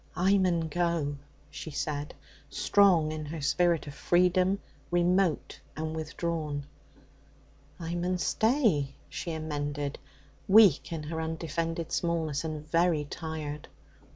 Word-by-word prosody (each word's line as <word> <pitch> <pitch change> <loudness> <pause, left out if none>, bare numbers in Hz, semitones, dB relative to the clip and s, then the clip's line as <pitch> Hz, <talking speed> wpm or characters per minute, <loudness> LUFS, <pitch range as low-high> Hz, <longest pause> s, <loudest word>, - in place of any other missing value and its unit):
'I 195 +2 +3
mun 180 -3 +2
go,' 165 -2 -1 0.4
she - - -7
said, 145 0 -3 0.3
strong 180 -6 +4
in 155 0 -4
her 160 +2 -5
spirit 170 +3 +2
of 145 - -8
freedom, 180 +5 +3 0.3
remote 175 -1 +1 0.2
and 160 0 -3
withdrawn. 155 -2 -3 1.1
'I 165 0 -4
mun 180 +1 0
stay,' 220 - +2
she 170 - -5
amended, 145 -2 -3 0.5
weak 200 -8 +6
in 160 -2 -4
her 160 +2 -4
undefended 165 +1 -3
smallness, 160 -4 -1
and 155 -1 -5
very 165 -2 +2
tired. 150 -1 -6
160 Hz, 115 wpm, -29 LUFS, 150-175 Hz, 1.1 s, weak